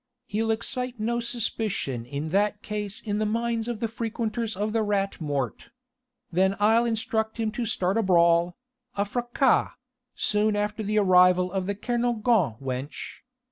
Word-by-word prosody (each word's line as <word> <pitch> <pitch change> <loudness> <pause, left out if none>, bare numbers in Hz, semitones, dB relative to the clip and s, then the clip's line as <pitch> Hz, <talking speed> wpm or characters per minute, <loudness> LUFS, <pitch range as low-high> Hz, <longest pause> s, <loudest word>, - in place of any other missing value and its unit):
He'll 220 +2 -1
excite 250 +2 -2
no 235 +2 0
suspicion 215 - -2
in 145 +4 -4
that 205 +3 +1
case 210 -1 -4
in 205 -1 -2
the 215 - +1
minds 230 +1 -1
of 240 -3 -3
the 230 - 0
frequenters 225 -1 -3
of 210 +2 -1
the 225 - +2
Rat 200 -3 -1
Mort. 140 -6 -3 0.6
Then 190 +3 +2
I'll 225 +3 +4
instruct 225 -1 -1
him 220 -1 0
to 230 +2 -3
start 190 +2 0
a - - +3
brawl 170 -2 +3 0.4
a 200 0 +1
fracas 240 +4 +1 0.4
soon 210 0 +1
after 210 +1 -1
the 215 0 -1
arrival 180 -2 +5
of 190 -1 -2
the 200 - -1
Kernogan 235 - +1
wench. 135 +1 -5
210 Hz, 155 wpm, -26 LUFS, 185-230 Hz, 0.6 s, arrival